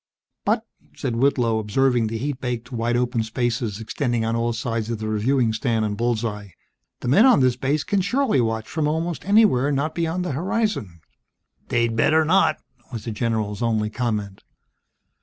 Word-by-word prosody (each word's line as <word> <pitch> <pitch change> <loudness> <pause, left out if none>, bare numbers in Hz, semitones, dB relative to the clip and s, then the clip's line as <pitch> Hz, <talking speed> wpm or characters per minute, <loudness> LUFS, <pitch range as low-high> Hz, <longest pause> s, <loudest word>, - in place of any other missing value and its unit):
"But - - +1 0.2
" - - -30
said 115 - -2
Whitlow, 120 -4 +2
observing 120 +2 +1
the 110 +1 -3
heat 140 +2 -3
baked 125 0 -4
wide 120 0 0
open 120 -1 0
spaces 115 -1 -2
extending 120 0 -1
on 115 +1 0
all 115 0 0
sides 115 -1 -3
of 115 - -2
the 110 0 -5
reviewing 115 +2 +1
stand 110 -1 0
and 105 -1 -2
bull's 120 +1 0
eye, 105 -4 -6 0.5
"the - - -4
men 200 - +6
on 255 - +6
this 130 -2 +3
base 140 +4 0
can 200 0 0
surely 225 - +1
watch 110 -1 -2
from 155 -2 -1
almost 160 +2 -2
anywhere 200 - +4
not 145 +3 -1
beyond 170 +2 -1
the 180 - -2
horizon." 170 - -2 0.7
"They'd 115 -1 +1
better 155 +7 +3
not!" 165 -2 +3 0.3
was 115 -4 -6
the 115 - -3
general's 110 -2 -2
only 110 -2 0
comment. 105 -5 -3
120 Hz, 175 wpm, -23 LUFS, 110-145 Hz, 0.7 s, men